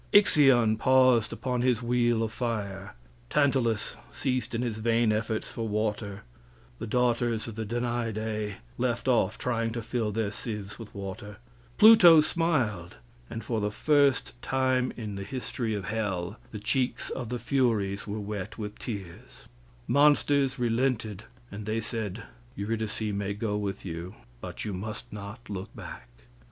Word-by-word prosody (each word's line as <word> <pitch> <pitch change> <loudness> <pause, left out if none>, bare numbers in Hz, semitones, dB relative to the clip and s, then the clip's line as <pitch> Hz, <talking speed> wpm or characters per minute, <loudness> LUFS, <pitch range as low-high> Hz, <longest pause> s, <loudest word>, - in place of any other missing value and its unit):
Ixion 135 - +6
paused 130 -2 +4
upon 125 -2 -2
his 125 -2 +2
wheel 120 -1 +2
of 110 - -2
fire; 105 - -3 0.3
Tantalus 130 -7 +1
ceased 125 -3 -1
in 120 - 0
his 115 -3 -2
vain 115 0 +3
efforts 110 +1 -1
for 115 -1 -4
water; 105 -1 -2 0.6
the - - -4
daughters 120 -1 +1
of 115 - -6
the 110 0 -4
Danaidae 110 -3 -2 0.2
left 120 0 0
off 120 -7 +2
trying 115 -2 -1
to 115 -1 -4
fill 115 -1 -1
their 105 -1 -1
sieves 105 -2 -6
with 110 -2 -10
water; 100 +1 -7 0.4
Pluto 195 -7 +9
smiled, 130 - 0 0.3
and 115 - -5
for 115 -3 -1
the 105 - +1
first 140 +4 +2
time 130 -1 +1
in 110 -4 -5
the 100 - -4
history 120 -1 -3
of 100 -3 -4
hell 100 -3 -2
the 110 - -7
cheeks 130 +4 -1
of 125 -4 -4
the 125 - -2
Furies 115 -6 0
were 105 +1 -3
wet 100 -2 -5
with 105 -2 -6
tears; 95 -7 -8 0.4
monsters 140 -1 +4
relented 115 -4 0 0.3
and 100 +1 -7
they 110 +1 0
said, 115 -3 -4 0.3
"Eurydice 110 +1 -2
may 100 0 -2
go 105 0 -2
with 100 -2 -3
you, 85 +1 -6 0.2
but - - -6
you 105 - -3
must 105 +4 -6
not 105 +3 -8
look 95 -2 -5
back." - - -9
115 Hz, 150 wpm, -28 LUFS, 105-125 Hz, 0.6 s, Pluto